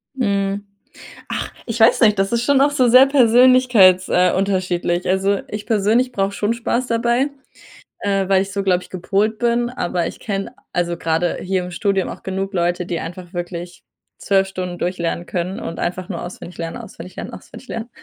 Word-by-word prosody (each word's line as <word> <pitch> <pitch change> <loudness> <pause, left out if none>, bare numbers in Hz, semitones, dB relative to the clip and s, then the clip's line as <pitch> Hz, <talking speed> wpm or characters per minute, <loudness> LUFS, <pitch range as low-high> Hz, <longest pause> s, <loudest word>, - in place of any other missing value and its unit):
Mhm. 200 -4 -1 0.6
Ach, - - -4
ich 230 -1 -3
weiß 225 0 +5
nicht, 210 -4 +4
das 195 +2 0
ist 235 0 +1
schon 280 +1 +3
auch 285 +1 +4
so 255 -3 +3
sehr 255 +3 +8
persönlichkeits 245 -7 +5
äh, 180 0 +3
unterschiedlich. 185 -2 0
Also, 195 +1 +1
ich 210 0 -6
persönlich 225 +3 +2
brauche 195 0 0
schon 205 +2 0
Spaß 235 +2 -2
dabei. 240 +4 +1 0.7
Äh, 195 -2 0
weil 190 -1 +4
ich 195 0 -7
so 200 0 -1
glaube 185 -2 +1
ich - - -15
gepolt 200 +4 0
bin, 240 +1 +1
aber 175 -8 -2
ich - - -7
kenne, 195 -2 -4 0.2
also, 175 -1 -1
gerade 165 +1 0
hier 185 -1 -1
im 180 - -7
Studium 195 0 0
auch - - -8
genug 195 +1 -3
Leute, 175 0 0
die 175 -2 -3
einfach 175 +1 -8
wirklich 175 -1 -6 0.4
12 195 -1 +2
Stunden 180 -2 -5
durchlernen 175 -1 -2
können 180 +2 -3
und 165 - -6
einfach 180 +1 -3
nur 175 -5 -4
auswendig 175 0 -9
lernen, 165 -1 -4
auswendig 185 -6 -10
lernen, - - -6
auswendig 255 - -12
lernen. 230 +1 -5
195 Hz, 185 wpm, -20 LUFS, 180-230 Hz, 0.7 s, sehr